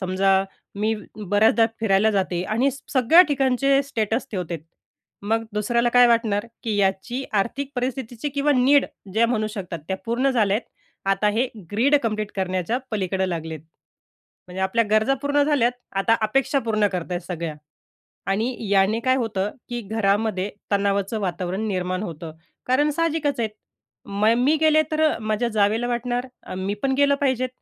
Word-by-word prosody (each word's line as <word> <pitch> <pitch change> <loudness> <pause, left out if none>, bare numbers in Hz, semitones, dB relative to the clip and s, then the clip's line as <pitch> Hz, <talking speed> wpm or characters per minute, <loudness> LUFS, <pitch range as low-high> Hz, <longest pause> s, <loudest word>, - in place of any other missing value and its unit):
समजा 190 +1 +2 0.3
मी 215 +2 0 0.2
बऱ्याचदा 215 +3 +3
फिरायला 215 0 +3
जाते 185 -3 -1
आणि 245 +7 +1
स 275 - -10
सगळ्या 275 +7 +7
ठिकाणचे 275 0 +2
स्टेटस 225 -3 -2
ठेवते. 175 -4 -4 0.6
मग 225 +2 0
दुसऱ्याला 235 +3 +1
काय 245 0 +6
वाटणार? 230 -2 +1 0.2
की 220 -3 -1
याची 200 +7 0
आर्थिक 245 +7 -1
परिस्थितीची 250 +1 -3
किंवा 285 +1 +1
नीड 275 +3 +4 0.3
ज्या 230 +1 +4
म्हणू 215 -3 0
शकतात 180 -4 -5
त्या 190 - -1
पूर्ण 255 +4 +1
झाल्या 210 -5 +2
आहेत, 235 - -7 0.4
आता 210 +1 +2
हे 250 +2 +2 0.2
ग्रीड 260 +8 +3
कंप्लीट 215 -1 -2
करण्याच्या 185 +4 -1
पलीकडं 190 -2 -1
लागलेत. 160 -3 -4 0.9
म्हणजे 185 +1 -6
आपल्या 230 +5 +2
गरजा 220 +5 +3
पूर्ण 285 0 +2
झाल्यात, 260 -5 +2 0.2
आता 195 +4 +2
अपेक्षा 270 +5 +1
पूर्ण 215 -3 +1
करत 180 0 -4
आहेत 175 - -1
सगळ्या. 170 -3 -4 0.8
आणि 225 +6 0
याने 200 +3 +3
काय 260 0 +3
होतं 210 -5 -1 0.2
की 240 0 -3
घरामध्ये 205 -1 0 0.2
तणावाचं 200 +1 0
वातावरण 185 +2 -2
निर्माण 185 0 -2
होतं. 165 -3 -6 0.3
कारण 290 +4 +2
साहजिकच 300 -4 0
आहेत 220 - -1 0.6
म 200 +2 -1
मी 280 +5 +3
गेले 310 0 +5
तर 310 - 0
अ, 310 - +3
माझ्या 215 +2 -1
जावेला 220 +2 +1
वाटणार, 245 +1 -2 0.2
अ, - - -8
"मी 190 +2 -2
पण 270 -1 +1
गेलं 280 0 +4
पाहिजेत." 260 -2 +1
220 Hz, 155 wpm, -23 LUFS, 195-255 Hz, 0.9 s, सगळ्या